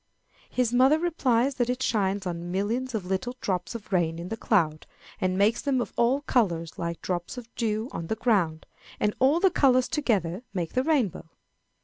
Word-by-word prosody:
His 245 -2 0
mother 260 +5 +5
replies 275 -7 +1
that 245 -1 +1
it 250 +1 -1
shines 200 -2 0
on 175 -1 -4
millions 230 +7 -1
of 205 -4 -3
little 190 +7 -2
drops 185 +4 -2
of 210 -3 -8
rain 165 -3 +1
in 170 +2 -6
the 225 - -2
cloud, 165 -9 +1 0.3
and 185 -2 0
makes 205 +3 +3
them 275 -3 +1
of 240 - -3
all 250 +4 +2
colors, 170 - 0
like 170 -1 -4
drops 175 +5 -3
of 240 -1 -9
dew 220 -1 -1
on 165 - -5
the 220 - -1
ground, 180 -10 +1 0.3
and 210 0 +1
all 275 +6 +4
the 385 0 +4
colors 255 -4 +4
together 200 - 0
make 170 -3 -2
the 255 - +2
rainbow. 260 - 0
220 Hz, 190 wpm, -27 LUFS, 180-255 Hz, 0.3 s, mother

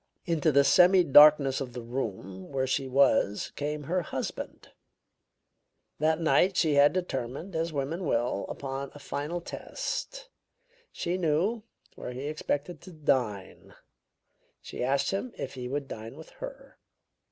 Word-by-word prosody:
Into 160 -3 +1
the 140 0 +5
semidarkness 150 -6 +6
of 125 -3 -5
the 120 -1 -6
room 95 -6 -5
where 135 -1 0
she 130 +1 -1
was 130 -6 +2
came 150 +1 -3
her 180 +5 0
husband. 165 - -6 1.3
That 155 +1 +2
night 180 +3 +3
she 160 -3 +3
had 145 +1 +6
determined, 165 0 -4
as 165 +1 -1
women 150 +5 -3
will, 115 -5 0
upon 135 0 -5
a - - -8
final 150 +5 -4
test. - - -5 0.6
She 175 +2 -3
knew 180 +8 +1 0.3
where 125 - -7
he 130 +3 -6
expected 150 +2 -3
to 185 - -12
dine; 125 - -2 0.8
she - - -6
asked 135 +2 +1
him 215 +6 -3
if 135 - -5
he 125 -2 -6
would 140 +1 -3
dine 115 +1 -8
with 160 - -12
her. - - -9
145 Hz, 140 wpm, -28 LUFS, 130-170 Hz, 1.3 s, semidarkness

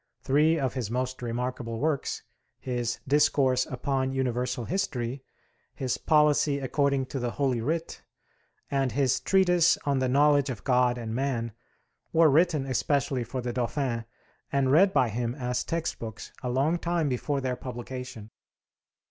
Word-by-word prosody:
Three 150 +4 +3
of 135 -4 -1
his 125 -6 -3
most 130 +2 -2
remarkable 120 -1 -3
works 145 +2 -1 0.4
his 120 -2 -2
'Discourse 135 -2 +3
upon 130 0 -1
Universal 125 -2 -1
History,' 130 - -2 0.5
his 130 -2 -2
'Policy 150 -1 +3
according 140 0 0
to 130 +1 -5
the 120 -1 -1
Holy 130 -2 0
Writ,' 165 +7 -3 0.7
and 135 -4 0
his 135 -1 +2
'Treatise 180 -3 +4
on 140 -2 +1
the 130 -1 +1
Knowledge 145 +1 +4
of 120 -5 -5
God 125 -1 +2
and 115 -2 -5
Man' 120 -3 -1 0.6
were 160 -2 +5
written 155 -2 +3
especially 135 0 0
for 125 +3 -5
the 120 0 -3
Dauphin, 120 -1 -2 0.5
and 135 -1 +2
read 190 +7 +6
by 130 -7 +3
him 120 +2 -2
as 125 -3 -2
textbooks 135 -9 -4
a 125 - -3
long 140 +7 +1
time 170 -2 0
before 140 +2 -1
their 130 -2 -2
publication. 125 -3 -7
130 Hz, 145 wpm, -27 LUFS, 125-145 Hz, 0.7 s, read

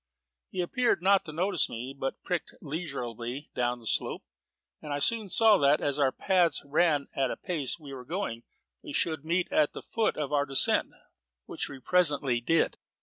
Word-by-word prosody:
He 185 - -3
appeared 235 0 0
not 195 0 +4
to 155 - -7
notice 180 +2 +1
me, 125 +4 -6
but 135 -1 -5
pricked 180 -2 -3
leisurably 135 -4 -5
down 120 0 -1
the 120 - -15
slope, - - 0 0.6
and 150 - -7
I 145 - -1
soon 215 +7 0
saw 220 0 +5
that, 140 +1 +4
as 145 0 -1
our 135 -2 +3
paths 175 -1 +1
ran 150 0 +2
and 135 - 0
at - - +1
the - - -4
pace 155 -8 -1
we 145 -4 -11
were 130 -2 -8
going, 155 - -4 0.4
we - - -9
should 160 -3 0
meet 170 +3 -1
at 150 -1 +2
the - - -8
foot 225 -1 -1
of 150 -2 -3
the 145 -1 +2
descent: 135 -1 +4 0.6
which - - -4
we 140 - -8
presently 145 -6 +2
did. 165 +7 +1
150 Hz, 190 wpm, -28 LUFS, 135-175 Hz, 0.6 s, saw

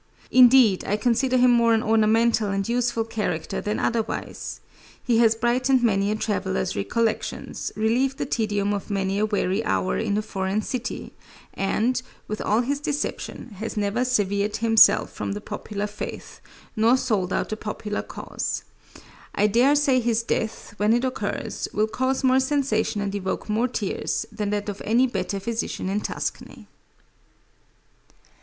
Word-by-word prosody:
Indeed, 250 -5 +6
I 205 - 0
consider 250 +4 +2
him 250 0 +5
more 235 -1 +4
an 220 - 0
ornamental 220 0 +3
and 195 0 -1
useful 240 -1 0
character 210 -7 -3
than 210 +1 -2
otherwise. 230 -1 -3 0.4
He 235 -3 +2
has 225 -1 +5
brightened 250 +3 +2
many 200 -3 +2
a 210 - 0
traveler's 190 -3 -1
recollections, 225 +2 -2
relieved 245 +5 +1
the - - -2
tedium 205 -4 0
of 200 +1 -4
many 195 -1 -1
a 215 - +2
weary 205 0 0
hour 185 - 0
in 210 -2 0
a 215 - -1
foreign 195 +1 -2
city, 250 +2 -5 0.4
and, 230 +6 0 0.3
with 215 - -4
all 215 +3 +2
his 280 +3 -1
deception, 290 -3 -4
has 220 0 -5
never 210 +4 0
severed 205 -4 0
himself 225 0 +5
from - - -3
the 205 - -4
popular 210 -1 -5
faith, 210 0 -7 0.3
nor 230 +3 +4
sold 205 -8 -1
out - - -1
the 215 - -2
popular 210 -1 -4
cause. - - -5 0.7
I 205 - +3
dare 240 +7 +4
say 285 -3 +3
his 230 -1 0
death, 220 -2 -3
when 210 +2 +3
it 240 +2 +1
occurs, 255 - -3
will 215 - +3
cause 260 +5 -1
more 260 0 +4
sensation 260 -6 0
and 200 -1 -2
evoke 190 -2 -3
more 220 +3 +1
tears, 220 -5 -2
than 210 -2 -3
that 205 0 -2
of 205 -1 -5
any 235 +4 +3
better 225 -5 -2
physician 220 -2 -3
in 205 +2 -1
Tuscany. - - -5
220 Hz, 155 wpm, -24 LUFS, 205-245 Hz, 0.7 s, Indeed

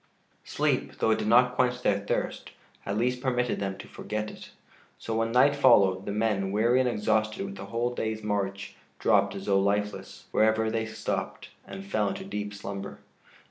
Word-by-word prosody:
] - - -39
Sleep, - - 0
though 110 - +2
it 110 - +2
did - - -2
not 125 +2 +5
quench 125 0 0
their 100 - +2
thirst, 100 - -3 0.4
at 100 +1 -1
least 125 +2 0
permitted 125 -2 0
them 95 -1 -3
to 100 - -10
forget 105 +1 -4
it; - - -12 0.5
so 115 - -4
when 115 0 0
night 130 +4 +5
followed, 95 -8 +4
the - - -1
men, 105 -2 0
weary 115 +5 +3
and 130 -1 +2
exhausted 110 - 0
with 195 0 -7
the - - -8
whole 120 +1 -1
day's 110 -2 -3
march, 100 -1 -3 0.2
dropped - - +2
as 95 - -6
though 100 -1 +3
lifeless, 105 +1 -2
wherever 110 0 +2
they 110 0 -1
stopped, 110 0 -4 0.2
and 195 0 -8
fell 195 - 0
into 190 0 -4
deep 105 - -4
slumber. 100 -1 -7
110 Hz, 185 wpm, -28 LUFS, 100-125 Hz, 0.5 s, not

